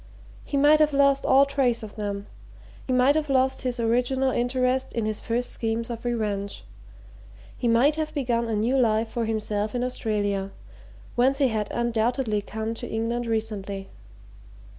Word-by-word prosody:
He 285 - -3
might 295 +2 +5
have 305 -1 +3
lost 275 0 +3
all 270 +1 +6
trace 260 -4 0
of 210 - -9
them; 205 -1 -4 0.6
he - - -2
might 255 +2 +4
have 305 -1 -1
lost 265 0 +2
his 250 -2 -3
original 250 +3 +1
interest 255 +1 0
in 230 -2 -1
his 215 -1 +1
first 240 +2 -1
schemes 230 +1 -2
of 235 +1 -7
revenge; 210 -4 -2 0.9
he 245 - -2
might 255 +7 +4
have 310 -1 -2
begun 235 -4 0
a 225 - -1
new 235 +6 +1
life 225 -2 +2
for 235 -1 -2
himself 215 0 -2
in 245 - 0
Australia, 205 -5 -1 0.6
whence 260 +3 +2
he 275 -3 +3
had 215 -2 -2
undoubtedly 235 -1 0
come 220 +2 -4
to 230 - -5
England 230 +2 -2
recently. 205 -3 -3
235 Hz, 160 wpm, -25 LUFS, 220-260 Hz, 0.9 s, all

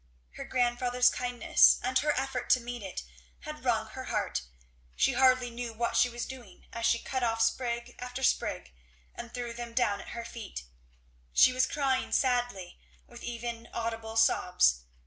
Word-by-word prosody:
Her - - -8
grandfather's 245 0 +2
kindness 245 -1 +4
and 255 +1 +2
her 300 0 +1
effort 260 -2 -3
to 255 - +6
meet 240 0 -6
it 190 -2 -6 0.4
had - - -8
wrung - - +1
her - - -7
heart; - - -1 0.5
she - - +2
hardly 255 -2 +4
knew 235 -1 -5
what 235 +1 -2
she 245 - +4
was 240 0 -5
doing, 260 -2 -11
as 230 0 0
she 235 - +3
cut 260 +2 -3
off 225 -2 0
sprig 235 +1 0
after 250 +1 -6
sprig - - 0 0.4
and 235 0 -8
threw 240 -1 -5
them 235 0 -7
down 210 -5 +1
at - - -12
her 235 - -5
feet; 220 - -7 0.7
she 255 - +6
was 255 +1 +2
crying 270 -3 0
sadly, 245 -8 0 0.3
with 240 0 -13
even 235 -1 -5
audible 225 -1 -4
sobs. - - +3
240 Hz, 165 wpm, -30 LUFS, 230-250 Hz, 0.7 s, to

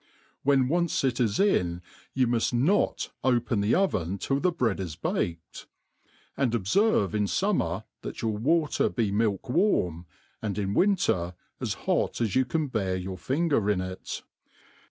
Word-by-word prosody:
When 135 -2 +3
once 170 +2 +1
it 130 -3 0
is 110 -4 +1
in^ 90 - +2 0.3
you 130 -1 +3
muft 120 0 0
not 150 +13 +1
open 120 -4 +1
the 105 +2 +2
oven 100 - 0
till 135 +7 -1
the 180 +4 +2
bread 120 - 0
is 85 -5 -4
baked; 85 0 -3 0.7
and 125 -4 +1
ob 110 - -1
ferve 150 - +2
in 105 -1 +1
fummer 105 - 0 0.2
that - - -7
your 110 -2 0
water 150 +8 +1
be 110 -5 -1
milk 105 -2 0
warm, 90 - +1 0.3
and 105 -3 -3
in 100 -1 -1
winter 100 - +2 0.2
as - - -2
hot - - 0
as 115 -5 0
you 130 0 +4
can 155 +5 -1
bear 100 -8 -1
your 95 +1 -4
finger 140 - +1
in 100 -3 +2
it. 95 0 -5
115 Hz, 160 wpm, -27 LUFS, 95-145 Hz, 0.7 s, you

